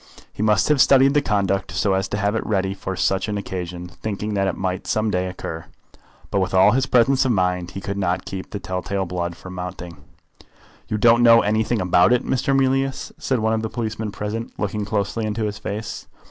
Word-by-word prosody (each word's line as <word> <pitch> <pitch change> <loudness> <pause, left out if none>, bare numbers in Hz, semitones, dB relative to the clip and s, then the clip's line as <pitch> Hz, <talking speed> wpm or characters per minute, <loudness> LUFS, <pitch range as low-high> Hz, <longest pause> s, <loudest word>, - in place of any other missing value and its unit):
He - - -6
must 105 -1 +3
have 150 -3 +4
studied 135 0 +5
his 145 -1 +2
conduct 100 -3 0
so 100 -1 +1
as 95 0 0
to 105 - -3
have 100 0 0
it 115 - -1
ready 95 -2 0
for 95 -1 -5
such 95 +2 0
an 105 - -2
occasion, 90 -3 -5
thinking 105 +3 -5
that 100 -1 +1
it - - -2
might 95 -1 -3
some 110 0 0
day 90 0 0
occur. 80 -3 -6 0.7
But 100 - +1
with 95 0 -1
all 95 +2 +6
his 130 +2 +1
presence 130 +2 +4
of 130 - +1
mind 90 -2 0
he - - -5
could 100 0 -4
not 90 -1 -1
keep 95 -1 -6
the - - -5
tell 90 -1 -4
tale 95 0 -2
blood 85 -1 -3
from 95 +2 -10
mounting. 90 -2 -7 0.9
"You 105 - -1
don't 115 +2 +5
know 115 -1 +7
anything 110 +2 +1
about 90 +2 +4
it, 125 - +1
Mr. 135 +1 +1
Mealyus?" 135 0 0
said 130 - 0
one 110 0 +1
of 110 - 0
the 110 - -3
policemen 110 -2 -3
present, 105 +3 -4
looking 105 0 -2
closely 100 +2 -2
into 110 +1 -2
his 105 0 -4
face. 105 +1 -5
105 Hz, 215 wpm, -22 LUFS, 95-110 Hz, 0.9 s, know